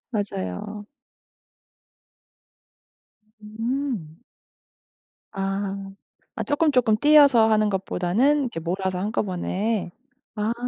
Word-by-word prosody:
맞아요. 200 - -4 2.6
음. 225 - -4 1.2
아. 195 0 -3 0.4
아 - - -3
쪼끔쪼끔 275 -7 +2
띄어서 280 -5 +6
하는 215 -1 +3
것보다는 200 +9 +1
이렇게 235 -10 -4
몰아서 185 +2 -2
한꺼번에. 200 0 -2 0.4
아. 215 +2 -1
210 Hz, 170 characters per minute, -24 LUFS, 190-240 Hz, 2.6 s, 띄어서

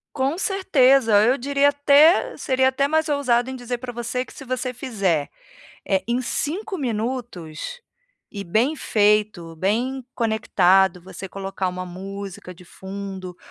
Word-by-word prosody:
Com 275 +4 0
certeza, 270 - +3
eu 250 +5 +3
diria 280 +2 +2
até 290 +10 +4
seria 260 0 +2
até 265 +1 +1
mais 315 +2 +1
ousada 255 -4 +1
em 260 - -5
dizer 245 -1 -4
pra 245 0 -7
você 245 +2 -3
que - - -15
se - - -10
você 255 0 -3
fizer, 195 - -1 0.6
eh, 190 -1 +1
em 245 +2 0
5 380 - -3
minutos 235 - -4 0.5
e 200 - -5
bem 220 - +1
feito, 210 - +1
bem 235 +10 -1
conectado, 190 -5 +2
você 190 +1 -9
colocar 195 0 -4
uma 180 0 -5
música 190 0 -8
de 180 - -16
fundo 190 0 -8
235 Hz, 140 wpm, -22 LUFS, 195-270 Hz, 0.6 s, até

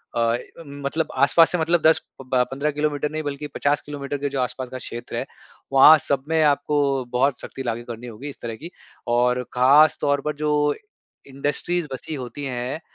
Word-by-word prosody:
अ, 115 0 +2 0.3
मतलब 140 +3 -3
आस-पास 140 +5 +5
से 180 - +1
मतलब 165 +1 +2
10 160 0 +5 0.2
प - - -8
ब 125 -1 +4
15 140 +3 -1
किलोमीटर 150 0 -1
नहीं 155 0 -3
बल्कि 145 0 -4
50 145 +1 +1
किलोमीटर 145 -1 -5
के 140 +1 -2
जो 135 -1 -3
आस-पास 125 0 -3
का 130 - -6
क्षेत्र 120 -1 -7
है - - -2 0.5
वहाँ 145 +4 +9
सब 140 -2 0
में 160 0 +2
आपको 145 0 +2 0.3
बहुत 130 +1 +1
सख्ती 135 - -7
लागू 120 -1 -3
करनी 120 +1 -7
होगी 120 +5 -8
इस 140 - -12
तरह 115 -1 -5
की। 165 +9 -10 0.4
और 125 +1 +2
ख़ास 140 +5 +5
तौर 145 -1 +1
पर 150 0 -1
जो 150 - +1 0.8
इंडस्ट्रीज़ 145 +5 -1
बसी 150 +4 -6
होती 130 +1 -7
है 125 +2 -3
140 Hz, 190 wpm, -23 LUFS, 125-150 Hz, 0.8 s, वहाँ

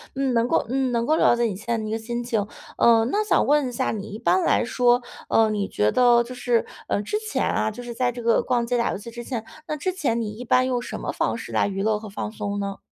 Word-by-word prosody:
嗯， 270 -1 0
能 230 0 +2
够 - - +1
嗯， 260 -1 0
能 235 0 +1
够 310 +3 +2
了 - - +5
解 240 - 0
你 210 -5 -1
现 230 +3 -2
在 220 - -4
一 215 - -4
个 220 - 0
心 235 +2 -4
情。 225 -4 -1 0.3
呃， 230 -1 +5
那 420 - +2
想 - - +3
问 290 -2 +3
一 250 - -4
下 - - 0
你， 210 -1 -5
一 - - -5
般 185 -2 +2
来 - - +3
说， 245 +1 +3 0.3
呃， 225 -1 +3
你 205 -2 -1
觉 105 +1 +1
得 240 -1 +5
就 245 +2 -9
是， 245 -2 0 0.2
嗯， 205 - 0
之 420 - -1
前 - - 0
啊， - - 0
就 215 +3 -8
是 240 -1 -6
在 245 0 0
这 240 0 -7
个 230 0 +3
逛 240 -2 0
街 245 +1 0
打 235 - +1
游 - - -3
戏 235 +4 -9
之 240 0 -8
前， 235 -4 -4 0.2
那 305 - -2
之 335 +5 -2
前 265 -11 -1
你 215 - -3
一 235 +4 -8
般 255 +2 +3
用 250 -2 0
什 - - -6
么 - - -2
方 - - -1
式 - - -7
来 - - +2
娱 195 -1 -3
乐 215 0 +1
和 220 - -9
放 205 +1 -5
松 205 -2 -4
呢？ 200 0 -4
235 Hz, 305 characters per minute, -24 LUFS, 215-245 Hz, 0.3 s, 了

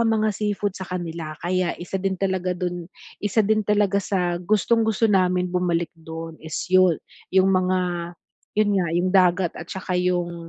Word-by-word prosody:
ang 230 - +3 0.2
mga 215 - +3
seafood 205 -1 -1
sa 190 -1 -8
kanila 165 -3 -5
kaya 180 0 0
isa 185 +2 -4
din 190 0 -1
talaga 185 -1 -1
do'n 175 -1 -4 0.3
isa 210 +1 +2
din 215 +1 +2
talaga 205 -1 +2
sa 180 -3 -1
gustong-gusto 220 +3 +2
namin 185 -4 +3
bumalik 175 -2 0
do'n 165 0 -7
is 160 0 -4
'yon, 185 -3 +5 0.3
'yong 190 0 +4
mga 185 0 +2 0.8
'yon 215 -1 +3
nga 175 - 0
'yong 175 +2 +1
dagat 180 -2 +4
at 170 - -8
saka 190 -1 -5
'yong, 175 -2 -1
185 Hz, 165 wpm, -23 LUFS, 175-195 Hz, 0.8 s, yon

